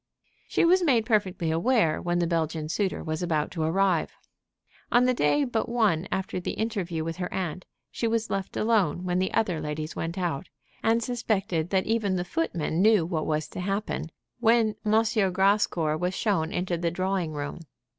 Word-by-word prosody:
She - - +2
was 365 +2 +5
made 250 -10 +3
perfectly 190 -7 +1
aware 170 -1 +2
when 175 0 0
the 175 - +2
Belgian 160 -2 -1
suitor 190 +3 -1
was 155 0 -3
about 155 -4 0
to 165 - -4
arrive. 175 +1 +1 0.8
On 245 +1 +5
the 255 - +3
day 245 - +2
but 235 -4 -1
one 210 -8 +1
after 190 -1 -2
the 175 - -3
interview 190 -8 -2
with 165 +1 -4
her 180 -1 -4
aunt 185 -1 -3 0.3
she 230 - -1
was 225 0 -1
left 195 -1 -3
alone 200 -7 +2
when 180 0 0
the 190 - 0
other 185 -8 0
ladies 155 +1 -4
went 165 +3 -4
out, 175 -7 -2 0.3
and 230 +1 +2
suspected 195 -9 -1
that 190 0 +1
even 215 -4 +1
the 180 -1 -2
footmen 175 - -1
knew 210 -4 +5
what 160 -3 -2
was 155 0 -1
to - - -7
happen, 195 -2 -2 0.3
when 225 -2 +3
M. 215 +1 +3 0.3
Grascour 190 -5 +2
was 180 +2 -1
shown 185 -7 0
into 180 -3 -1
the 170 0 0
drawing 185 -2 -1
room. 145 +1 -5
185 Hz, 180 wpm, -27 LUFS, 165-220 Hz, 0.8 s, was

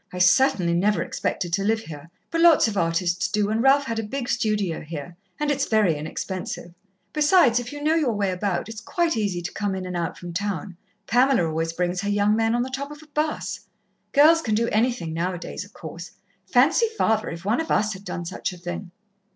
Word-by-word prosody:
I 180 - -7
certainly 180 0 +4
never 200 +5 +2
expected 175 -3 -3
to 195 +2 +1
live 220 +2 +1
here 155 -5 -10 0.2
but 330 - 0
lots 335 -7 +6
of 215 - -3
artists 170 0 +1
do, 210 -1 0
and 220 +1 +1
Ralph 275 +2 +5
had 230 -1 -2
a - - -2
big 245 +3 -4
studio 210 -7 0
here. 160 +1 -7 0.2
And 300 0 +1
it's 285 - 0
very 215 -7 +3
inexpensive. 170 +3 -5 0.4
Besides, 300 -5 +4
if 245 0 -6
you 290 0 -7
know 310 +1 +3
you 315 -5 +2
way 205 -4 0
about, 180 -1 -2
it's 225 0 -8
quite 340 +1 0
easy 200 -5 -1
to 175 - -4
come 200 -1 -2
in 185 -1 -4
and 180 -1 -5
out 170 -1 -2
from 175 -1 -8
town. 190 -1 -3 0.3
Pamela 245 -5 +3
always 165 +1 -1
brings 180 +1 -1
her 205 - -2
young 205 +1 +2
men 225 +1 +2
on 240 - +1
the 260 - -6
top 280 +2 -4
of 295 +1 -11
a - - -18
'bus. 305 +1 -2 0.5
Girls 315 +3 +6
can 220 -8 0
do 230 +2 +1
anything 225 -7 0
now 180 +3 -1
a - - -5
days, 175 - -6
of - - -16
course. 170 +1 -9 0.4
Fancy 305 - +4
father, 220 0 +1
if 170 +2 -8
one 225 +8 +2
of 320 - -6
us 215 +1 +2
had 190 0 -10
done 175 -3 -5
such 185 +3 -3
a - - -10
thing!" 175 +2 -6
205 Hz, 225 wpm, -24 LUFS, 175-250 Hz, 0.5 s, lots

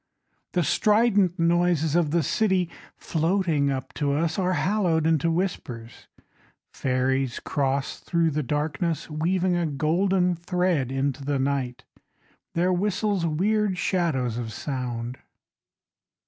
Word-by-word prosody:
The 175 - +2
strident 210 -1 +3
noises 170 -2 +2
of 170 -3 +3
the 165 +1 +1
city 185 0 +1 0.3
Floating 165 -3 +1
up 135 -2 -4
to 140 -1 +2
us 160 +4 0
Are 185 0 +1
hallowed 180 -5 +1
into 160 0 +2
whispers. 130 -10 -4 0.7
Ferries 130 0 0
cross 140 -1 -1
thru 170 -2 +1
the 150 +1 -1
darkness 150 +4 -2
Weaving 175 +4 +1
a 175 -1 0
golden 180 +5 +1
thread 175 -5 0
into 135 0 -1
the 140 0 0
night, 130 -2 -2 0.7
Their 180 +2 +2
whistles 200 -1 0
weird 200 +4 +1
shadows 135 - 0
of 115 -2 -5
sound. 125 -1 -4
165 Hz, 120 wpm, -25 LUFS, 140-180 Hz, 0.7 s, strident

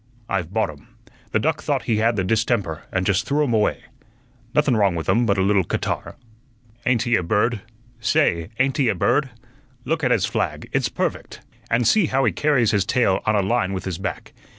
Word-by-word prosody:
I've 90 -4 -2
bought 110 -5 0
'um. 75 -1 -17 0.4
The - - +2
duck - - 0
thought - - -1
he 110 - 0
had 115 +1 +2
the 95 - 0
distemper, 100 -5 -1
and 90 0 -1
just 100 -1 +1
threw 150 +2 +2
'um 130 -5 0
away. 105 -2 +1 0.7
Nothun 145 -4 +3
wrong 100 -4 +2
with 80 -2 -4
'um 120 0 +2
but 100 -1 +2
a 95 - +2
little 100 -1 +3
catarrh. - - -3 0.7
Ain't 125 -3 +3
he 120 -1 +2
a - - +2
bird? 105 +5 0 0.4
Say, 85 -5 +1
ain't 135 +3 +1
he 135 -5 +2
a 105 - +1
bird? 140 - +1 0.6
Look 160 0 -1
at 125 - +2
his - - +2
flag; - - -2
it's - - +1
perfect; - - -4 0.3
and 115 0 +2
see 205 - +4
how 135 0 +1
he 115 - +3
carries 130 - +2
his 100 -3 +2
tail 95 -2 +1
on 110 - +3
a 100 - +2
line 100 -2 0
with 95 - -4
his 95 -2 -4
back. 95 - -5
110 Hz, 210 wpm, -22 LUFS, 95-125 Hz, 0.7 s, see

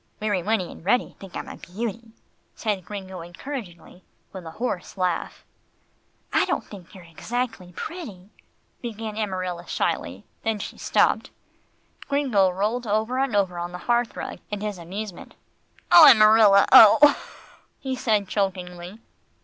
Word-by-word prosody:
"Weary 205 -4 -1
Winnie 200 -1 -1
and - - -13
Reddy 245 +7 0
think 195 -2 -12
I'm - - -6
a - - -9
beauty," 225 +4 -6 0.5
said 205 -5 -2
Gringo 190 0 -8
encouragingly, 180 +2 -8
and 180 - -18 0.3
with 185 -3 -9
a 160 - -11
hoarse 210 -6 -4
laugh. 180 -2 -2 0.9
"I - - +4
don't - - -2
think 195 -4 -13
you're 185 - -12
exactly 220 +3 -5
pretty," 215 - -8 0.5
began 225 -2 -6
Amarilla 185 -5 -4
shyly, - - -3 0.2
then 225 -1 0
she - - -8
stopped. - - +1 0.8
Gringo 255 -10 +2
rolled 215 +6 -2
over 220 +5 0
and 270 -5 0
over 185 -3 0
on 175 +1 -5
the - - -5
hearth 240 -1 0
rug, - - -6
in 210 -1 -5
his 210 -3 -4
amusement. 190 +2 -8 0.6
"Oh! 330 -3 +10
Amarilla! 215 -2 +6
Oh!" 285 +7 +8 0.6
he 265 -1 -4
said 215 -5 0
chokingly. 185 -1 -4
205 Hz, 140 wpm, -24 LUFS, 180-225 Hz, 0.9 s, Oh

